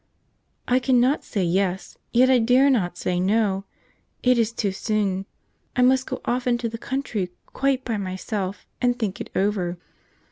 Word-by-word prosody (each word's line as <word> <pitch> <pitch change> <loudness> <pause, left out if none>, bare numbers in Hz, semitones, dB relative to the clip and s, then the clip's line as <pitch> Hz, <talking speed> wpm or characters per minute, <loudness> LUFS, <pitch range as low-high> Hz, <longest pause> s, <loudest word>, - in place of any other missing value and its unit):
"I 250 +1 +3
cannot 255 +2 +2
say 200 - -2
yes, 185 +1 0 0.2
yet 250 +2 +5
I 260 -1 +5
dare 250 +4 +4
not 180 -8 0
say 180 0 -1
no; 195 0 +1 0.6
it 250 -1 +4
is 230 -1 +2
too 210 -4 -1
soon. 195 -1 -1 0.5
I 250 - +3
must 260 +1 +3
go - - -4
off 250 +1 -1
into 240 -1 +1
the 230 0 -6
country 240 -9 -2 0.2
quite 270 -1 -1
by 230 -3 -1
myself 190 0 -4 0.2
and 245 -1 +2
think 215 -6 -3
it - - -6
over." 190 -3 0
225 Hz, 165 wpm, -24 LUFS, 190-250 Hz, 0.6 s, yet